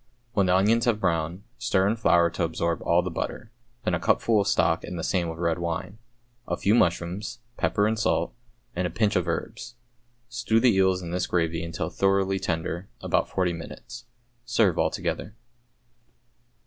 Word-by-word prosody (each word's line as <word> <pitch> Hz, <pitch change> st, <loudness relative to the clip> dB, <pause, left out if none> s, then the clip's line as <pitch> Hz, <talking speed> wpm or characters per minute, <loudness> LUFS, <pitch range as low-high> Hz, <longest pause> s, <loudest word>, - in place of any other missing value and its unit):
When 100 Hz, -3 st, +2 dB
the 90 Hz, -, +4 dB
onions 110 Hz, +5 st, +3 dB
have 115 Hz, -3 st, +2 dB
browned, 85 Hz, 0 st, -1 dB, 0.2 s
stir 95 Hz, 0 st, +2 dB
in 105 Hz, -, +2 dB
flour 85 Hz, -6 st, +3 dB
to -, -, -2 dB
absorb 85 Hz, 0 st, -1 dB
all 85 Hz, +1 st, +3 dB
the 90 Hz, -, -3 dB
butter, 110 Hz, +6 st, -5 dB, 0.3 s
then 90 Hz, -, 0 dB
a 85 Hz, -, +1 dB
cupful 110 Hz, +5 st, +2 dB
of 100 Hz, -, -2 dB
stock -, -, +2 dB
and 90 Hz, -, -6 dB
the 80 Hz, -, -4 dB
same 90 Hz, -3 st, 0 dB
of 80 Hz, -, -6 dB
red 85 Hz, -1 st, 0 dB
wine, 95 Hz, +5 st, -4 dB, 0.5 s
a -, -, -1 dB
few 100 Hz, -, +2 dB
mushrooms, 90 Hz, 0 st, 0 dB, 0.2 s
pepper 105 Hz, -, +1 dB
and 110 Hz, +1 st, 0 dB
salt, -, -, +1 dB, 0.4 s
and 90 Hz, 0 st, 0 dB
a -, -, -5 dB
pinch 105 Hz, +4 st, +1 dB
of -, -, +1 dB
herbs. 120 Hz, -, -4 dB, 0.5 s
Stew 115 Hz, -1 st, +1 dB
the 120 Hz, -1 st, +4 dB
eels 95 Hz, -1 st, +2 dB
in 85 Hz, -, -5 dB
this 90 Hz, +1 st, -1 dB
gravy 85 Hz, -1 st, 0 dB
until 85 Hz, 0 st, -4 dB
thoroughly 95 Hz, 0 st, +1 dB
tender, 85 Hz, +3 st, -3 dB
about -, -, 0 dB
forty 90 Hz, -2 st, 0 dB
minutes. 120 Hz, +9 st, -9 dB, 0.4 s
Serve 115 Hz, -7 st, +2 dB
altogether. 100 Hz, +5 st, -2 dB
95 Hz, 175 wpm, -26 LUFS, 85-105 Hz, 0.5 s, the